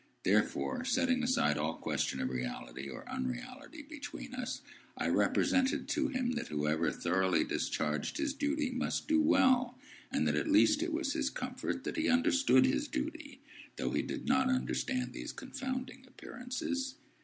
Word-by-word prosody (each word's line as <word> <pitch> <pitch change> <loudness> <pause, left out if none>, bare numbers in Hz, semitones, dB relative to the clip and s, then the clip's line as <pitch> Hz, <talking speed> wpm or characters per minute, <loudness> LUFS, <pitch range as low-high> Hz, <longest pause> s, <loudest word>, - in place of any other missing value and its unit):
Therefore, 255 -1 +1
setting 260 0 +2
aside 240 - +2
all 75 +2 -1
question - - -1
of - - 0
reality 60 +1 -5
or 65 - -9
unreality 65 - -5
between 290 -3 -8
us, 250 -1 -4 0.4
I - - -1
represented 270 +3 +2
to 310 -2 +1
him 255 -3 -1
that 240 -2 -3
whoever 75 +2 +1
thoroughly 95 +2 +2
discharged 75 -1 -1
his 305 -3 0
duty 290 -1 0
must 250 0 -2
do 310 0 +4
well, 255 -5 +4 0.3
and - - +1
that - - +2
at - - 0
least 300 0 +5
it 340 0 -1
was 315 -3 -1
his 300 -4 0
comfort 255 +1 -4
that - - -4
he 315 0 +1
understood 270 +1 +5
his 290 +2 +1
duty, 295 -2 -5 0.3
though - - -2
he - - +1
did - - -5
not 260 0 +3
understand 255 0 -1
these - - -5
confounding 260 -1 -5
Appearances. 265 +2 -4
260 Hz, 155 wpm, -33 LUFS, 245-290 Hz, 0.4 s, least